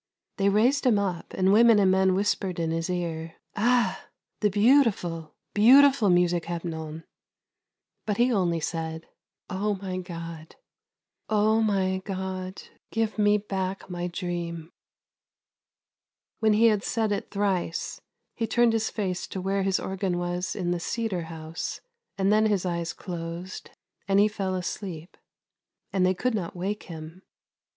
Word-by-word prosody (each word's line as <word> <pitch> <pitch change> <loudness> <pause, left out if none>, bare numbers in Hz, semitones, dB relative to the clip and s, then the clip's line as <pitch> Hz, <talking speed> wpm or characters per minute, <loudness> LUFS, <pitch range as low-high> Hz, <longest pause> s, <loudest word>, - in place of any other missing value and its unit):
They 200 0 +3
raised 245 +7 +3
him 225 -4 +5
up, 185 -4 -2
and 190 +1 +3
women 230 0 +7
and 195 -2 +4
men 190 0 +3
whispered 195 -2 0
in 165 -1 0
his 165 +1 -2
ear: 165 -2 -3
" - - -44
Ah, 235 -2 +1 0.3
the 210 - +3
beautiful, 205 - +2 0.2
beautiful 260 +1 +6
music, 175 -1 +3
Hepnon! 165 -2 -5 0.5
" - - -59
But 205 -2 0
he 245 +1 +3
only 175 -5 +1
said: 160 0 -4 0.2
" - - -65
Oh 205 +2 0
my 185 -1 -4
God, 165 -3 -8 0.7
Oh 215 +1 +3
my 190 -3 +1
God, 185 -1 -5 0.3
give 225 -1 -1
me 205 0 +5
back 195 -2 -4
my 175 0 -3
dream! 170 -2 -4 0.9
" - - -63
When 220 -1 +4
he 220 +2 +4
had 215 -3 +4
said 220 -2 0
it 205 - -2
thrice, 195 -5 -1 0.3
he 225 - -2
turned 235 +1 +3
his 225 -1 0
face 185 -5 -3
to 190 - -5
where 195 +1 0
his 190 -1 +1
organ 190 -2 -2
was 175 +1 -2
in 180 -3 -1
the 175 - 0
cedar 200 -3 -2
house, 160 0 -6 0.4
and 195 +1 +3
then 215 +1 +4
his 200 -4 0
eyes 170 -1 -2
closed, 175 +1 -7 0.4
and 195 0 +4
he 205 - +6
fell 195 -3 -2
asleep. 180 -2 -5 0.8
And 190 -2 +2
they 185 +1 +3
could 250 +6 0
not 185 -6 -3
wake 195 +4 -3
him. 165 +2 -9
190 Hz, 155 wpm, -26 LUFS, 175-210 Hz, 0.9 s, women